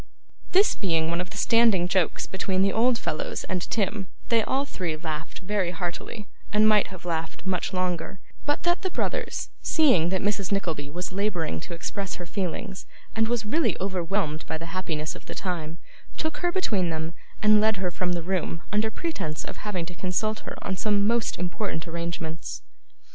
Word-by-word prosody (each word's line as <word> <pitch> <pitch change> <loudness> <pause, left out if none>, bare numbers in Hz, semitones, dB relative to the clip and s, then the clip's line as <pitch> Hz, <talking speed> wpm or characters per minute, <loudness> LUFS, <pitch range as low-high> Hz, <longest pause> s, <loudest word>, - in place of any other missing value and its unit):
This 395 +3 +6
being 165 -4 +1
one 170 +1 +1
of 180 - -5
the 215 - -7
standing 225 -5 +5
jokes 180 -2 +2
between 190 0 +1
the 195 - +3
old 240 +2 +4
fellows 155 - -2
and 180 - -1
Tim, 200 0 0 0.2
they 230 -1 +5
all 270 +5 +1
three 175 - -2
laughed 155 +2 -4
very 195 -2 +1
heartily, 180 +4 -4 0.2
and 215 +1 +5
might 215 -1 +5
have 185 -2 -10
laughed 165 0 -2
much 190 0 0
longer, 180 0 -1 0.3
but 290 - +1
that 345 +1 +3
the 375 - 0
brothers, - - -1
seeing 255 - +4
that 190 0 0
Mrs. 205 -1 0
Nickleby 165 -8 0
was 180 +5 -4
labouring 185 - 0
to 170 - -6
express 195 +3 -3
her 175 - -6
feelings, 190 +2 -3 0.3
and 225 0 +3
was 235 -2 0
really 305 +10 +2
overwhelmed 185 -4 0
by 160 - -1
the 165 +1 -7
happiness 160 -4 -2
of - - -12
the - - -5
time, 165 -4 -3 0.4
took 315 0 -1
her 350 - +1
between 210 - +1
them, 160 0 -2 0.3
and 210 0 +7
led 220 -1 +3
her 185 -1 0
from 180 +1 0
the 170 -1 -1
room 175 -2 -1
under 215 +1 +3
pretence 220 - -3
of - - -6
having 190 -5 -2
to 180 - -7
consult 195 +5 0
her - - -7
on 190 - -1
some 205 +1 +2
most 230 +1 +2
important 175 -2 -2
arrangements. 170 -1 -4
185 Hz, 185 wpm, -27 LUFS, 170-215 Hz, 0.4 s, and